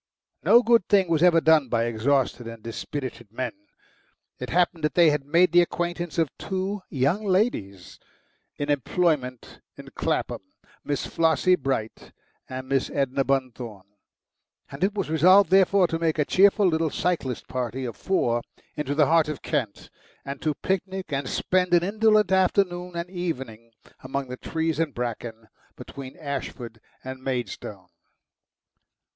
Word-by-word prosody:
No 240 +1 +6
good 230 -5 +3
thing 195 -4 +3
was 160 -2 +2
ever 175 -2 +6
done 160 -5 +4
by 115 0 +1
exhausted 120 +1 0
and 115 -1 -9
dispirited 120 -1 -6
men. 130 +3 -3 0.9
It - - -5
happened 175 -2 +1
that 150 - 0
they 170 -3 +6
had 145 -2 -2
made 170 +3 +4
the 175 +1 +6
acquaintance 175 -2 -3
of 160 -4 0
two 190 +1 -3
young 145 +10 0
ladies 105 - -1 0.6
in 145 0 -1
employment 145 -3 -1 0.2
in - - -11
Clapham, - - -2 0.4
Miss 145 -2 -2
Flossie 165 +2 +2
Bright 130 -9 -3 0.4
and 130 0 -6
Miss 135 -1 0
Edna 135 0 0
Bunthorne, 125 -7 -3 0.9
and 140 +5 -5
it 200 +2 +1
was 195 -3 -2
resolved 185 +5 +5
therefore 190 0 +5
to 165 - -2
make 165 -1 0
a 150 - +2
cheerful 200 +4 +4
little 160 -2 +2
cyclist 150 -8 -2
party 130 +1 -3
of 120 -3 -5
four 120 -11 0 0.3
into 145 -2 -2
the 150 0 +4
heart 160 +1 +3
of 150 - -6
Kent, 130 -10 -3 0.3
and 140 0 -6
to 155 -2 0
picnic 190 -3 -3
and 135 -1 -2
spend 180 -1 +1
an 170 - +3
indolent 215 0 +3
afternoon 180 -1 +1
and 170 +1 -4
evening 135 - -5 0.3
among 135 0 -4
the 125 - -6
trees 160 +1 -2
and 160 -4 -1
bracken 115 -2 -5 0.3
between 135 +1 -10
Ashford 125 -7 -6 0.2
and 130 0 -7
Maidstone. 120 -7 -5
150 Hz, 150 wpm, -25 LUFS, 130-180 Hz, 0.9 s, No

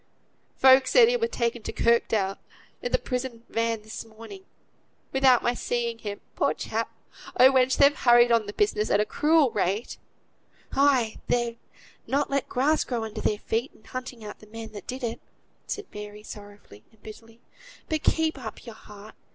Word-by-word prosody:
"Folk 260 0 +6
said 475 - +6
he - - +2
were 460 -1 +1
taken 235 - -2
to - - -5
Kirkdale, 220 -4 +1 0.4
i' - - -2
th' - - 0
prison 250 -2 -4
van, 230 -1 -1
this 215 0 -7
morning; 230 - -12 0.7
without 265 -2 +4
my 240 - +2
seeing 235 -1 -2
him, 205 -2 -6
poor - - +1
chap! - - -3 0.5
Oh! 260 +2 +8
wench! 260 -1 +3
but 280 - +7
they've 285 +1 +4
hurried 240 -1 +5
on 230 -3 +3
the 205 - -6
business 210 +1 0
at 200 - +3
a 210 - +2
cruel 300 +2 +3
rate." 205 +2 -2 0.8
"Ay! 265 -5 +3
they've 235 -1 0 0.5
not 280 +1 0
let 275 -1 -1
grass 295 +5 +2
grow 240 -3 -3
under 220 0 -6
their 210 - 0
feet, 230 +5 -3
in - - -22
hunting 250 -1 -7
out 210 - -9
the 215 - -16
man 225 0 -9
that 205 - -10
did 255 +1 -6
it," 230 -1 -3 0.5
said 415 - -4
Mary, 210 0 -9
sorrowfully 205 - -12
and 220 -2 -28
bitterly. 225 +1 -13 0.5
"But 315 -1 -1
keep 320 -3 +1
up 230 -2 -8
your 230 - -8
heart. 210 0 -14
235 Hz, 180 wpm, -26 LUFS, 215-265 Hz, 0.8 s, Oh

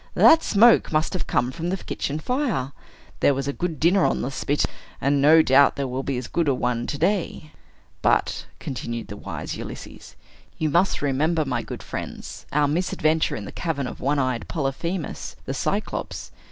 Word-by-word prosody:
"That 325 0 +7
smoke 230 -1 +5
must 155 +3 +1
have 185 - -3
come 125 +1 +1
from 165 +4 -4
the 190 - -1
kitchen 150 -4 -4
fire. 220 - -1 0.5
There 140 - +4
was 135 +1 -3
a 140 - -1
good 165 -3 -3
dinner 180 +3 +4
on - - +1
the 130 - -2
spit; 145 +2 0 0.3
and 140 +1 +2
no 160 +3 +7
doubt 140 0 +5
there 140 -1 -2
will 130 +1 -3
be 135 -1 -2
as 125 - -4
good 170 -2 0
a 135 - +3
one 120 -1 -1
to 145 - -3
day." 180 -4 -1 0.5
"But," - - +1
continued 120 -3 -5
the 105 - -6
wise - - -5
Ulysses, - - -9 0.4
"you 155 -2 0
must 175 -1 +2
remember, 155 +3 +1
my - - -1
good - - -8
friends, - - -7
our 145 0 +3
misadventure 160 0 +1
in 105 - -6
the - - -7
cavern 155 -6 -2
of - - -6
one 145 +3 +1
eyed 130 -3 -1
Polyphemus, 160 +3 -3
the - - -3
Cyclops! - - -3
145 Hz, 185 wpm, -24 LUFS, 135-170 Hz, 0.5 s, That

